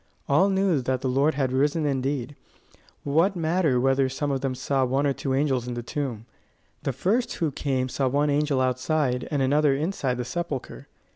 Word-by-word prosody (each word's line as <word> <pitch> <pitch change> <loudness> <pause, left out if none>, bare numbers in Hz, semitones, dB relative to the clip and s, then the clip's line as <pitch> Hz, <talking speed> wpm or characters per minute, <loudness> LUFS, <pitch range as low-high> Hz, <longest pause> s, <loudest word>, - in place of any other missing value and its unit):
All 180 +8 +4
knew 190 -6 +2
that 130 0 -1
the 135 - -1
Lord 140 +4 +2
had 135 -2 0
risen 145 +4 +1
indeed: 135 0 -2 0.7
what 165 +8 +2
matter 165 -5 +1
whether 135 +1 +2
some 145 +2 -2
of 135 -1 -1
them 135 -2 -2
saw 135 +1 0
one 135 +3 +1
or 140 - +2
two 135 0 -2
angels 135 -3 0
in 125 - -4
the 120 - -4
tomb? 120 -4 -4 0.6
The - - -1
first 195 - 0
who 160 -3 -1
came 130 -2 -1
saw 130 +1 -1
one 145 +3 +1
angel 145 -1 +1
outside 130 0 0
and 145 -3 0
another 145 +1 +3
inside 145 -5 -1
the 125 - -3
sepulchre. 150 -2 -5
140 Hz, 190 wpm, -25 LUFS, 130-150 Hz, 0.7 s, All